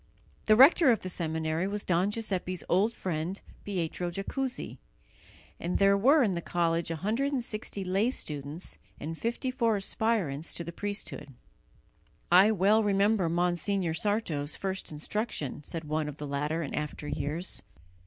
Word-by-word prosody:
The 215 - +7
rector 275 +5 +7
of 230 - +3
the 185 - -5
seminary 160 +1 -1
was 205 +1 -2
Don 180 +2 +2
Giuseppe's 190 -4 -2
old 200 +6 +3
friend 180 -2 -3 0.2
Pietro 175 -2 -2
Jacuzzi, 250 +9 -4 0.8
and 175 +2 -1
there 200 0 +5
were 270 +9 +5
in 210 - +2
the 170 -2 -2
college 170 -1 0
160 215 - -2
lay 195 +5 +2
students 150 - -6 0.2
and 165 +2 -4
54 235 - 0
aspirants 195 -7 -1
to 170 - -3
the 170 - -6
priesthood. 205 -9 -4 1.0
"I 185 +4 +8
well 210 +2 +4
remember 200 -2 +3
Monsignor 175 +1 0
Sarto's 165 -6 -1
first 190 -3 -3
instruction," 155 - -3
said 165 +2 -5
one 155 0 -1
of 150 - -8
the 150 - -5
latter 150 +4 -1
in 140 - -5
after 150 0 -4
years. 160 +5 -2
185 Hz, 140 wpm, -29 LUFS, 160-215 Hz, 1.0 s, I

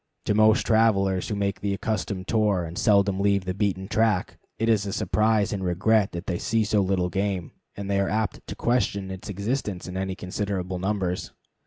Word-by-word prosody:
To - - +2
most 110 +2 +4
travelers 100 -5 +2
who 105 - -1
make 100 -1 -2
the 100 -1 0
accustomed 100 -3 -3
tour 105 -5 +2
and 80 +1 -8
seldom 100 -1 +3
leave 100 -1 +2
the 90 - -2
beaten 95 -1 -1
track, 105 -3 +1 0.2
it 115 - 0
is 105 -3 +2
a 100 - -3
surprise 110 -1 +1
and 95 -2 -3
regret 95 +4 +2
that 85 +2 -5
they 90 -2 -2
see 115 0 +1
so 105 -1 +2
little 95 -2 0
game, 95 -3 -2 0.2
and 100 -1 -6
they 100 0 +1
are 100 - +1
apt 110 +1 -2
to - - -5
question 100 -5 0
its 95 +3 -8
existence 100 -1 -3
in 90 - -7
any 95 0 -2
considerable 95 -1 -3
numbers. 95 -2 -2
100 Hz, 195 wpm, -25 LUFS, 95-105 Hz, 0.2 s, most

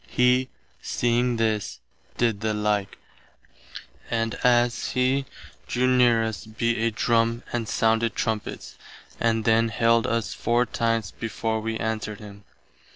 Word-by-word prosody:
He, 125 +1 +2 0.3
seeing 120 0 0
this, 110 -2 -1 0.4
did 115 -4 +1
the 110 -1 0
like, 105 -2 -1 1.1
and 115 -1 -1
as 120 -1 +2
[he] 130 +2 +1 0.4
drew 125 +1 0
near 125 -3 +4
us 110 -1 -4
beat 115 +2 -1
a 115 +1 +2
drum 115 +1 +1
and 120 -2 -2
sounded 115 0 +1
trumpets, 110 -3 -4 0.4
and 115 -2 +1
then 115 0 +3
hailed 115 0 +2
us 115 -2 -1
four 120 +1 +1
times 115 -4 -1
before 115 0 -3
we 110 0 -3
answered 110 -1 -3
him. 100 -2 -12
115 Hz, 130 wpm, -25 LUFS, 110-120 Hz, 1.1 s, near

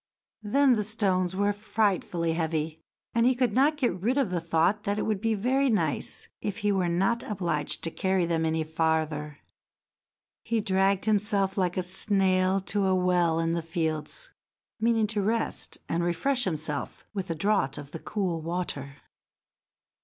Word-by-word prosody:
Then 265 +5 +4
the 210 - 0
stones 190 -4 0
were 205 +1 +2
frightfully 200 -5 0
heavy, 160 -1 -2 0.3
and 230 - +3
he 255 +1 +4
could 250 -1 +1
not 290 +4 +3
get 245 -10 0
rid 245 +7 +1
of 265 -9 +1
the 175 -2 -1
thought 170 +5 +1
that 200 +1 -1
it - - 0
would 210 -3 -1
be 225 -1 +1
very 260 +6 +2
nice 215 -3 -1
if 205 -1 -3
he 205 - +4
were 185 -3 +1
not 195 +7 +1
obliged 170 -8 -2
to 165 - -1
carry 190 0 +1
them 165 -1 0
any 160 0 0
farther. 155 -2 -1 1.0
He 230 -1 -1
dragged 195 -1 +1
himself 205 -2 +1
like 180 -2 0
a 185 - +1
snail 190 0 +2
to 195 +1 0
a 190 - +3
well 175 -3 +2
in 165 0 +1
the 170 0 0
fields, 165 - -3 0.5
meaning 225 0 +3
to 210 -1 -1
rest 225 +3 -1
and 170 +1 0
refresh 245 +9 +1
himself 155 -5 -3
with 195 -4 -4
a 165 - -1
draught 195 -5 +1
of 145 0 -9
the 165 - -6
cool 180 -5 -2
water. 155 -5 -4
190 Hz, 170 wpm, -27 LUFS, 165-215 Hz, 1.0 s, Then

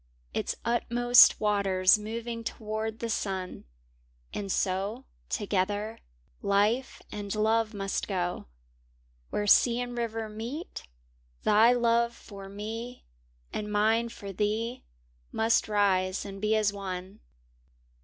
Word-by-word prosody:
Its - - -2
utmost 240 +1 +5
waters 200 -2 +3
moving 230 +2 -5
toward 220 0 -4
the 230 - -4
sun; 190 -3 -3 0.7
And 200 -2 -3
so, 200 +9 -1 0.2
together, 205 +1 -1 0.4
Life 205 +6 +1
and 205 0 -4
Love 220 +1 +1
must 195 -1 -2
go 180 - -2 0.8
Where 210 - -1
sea 235 +3 +5
and 245 0 -4
river 225 -2 -3
meet, 235 +10 -6 0.6
thy 220 +3 +6
love 235 -1 +2
for 195 -3 -11
me 225 +5 -6 0.5
And 210 0 -4
mine 220 +3 +2
for 200 -3 -8
thee 215 +5 -1 0.5
must 225 +1 +2
rise 195 -3 +1
and 195 -1 -8
be 215 +1 +2
as 210 -2 +2
one. 190 0 -6
215 Hz, 115 wpm, -28 LUFS, 200-230 Hz, 0.8 s, thy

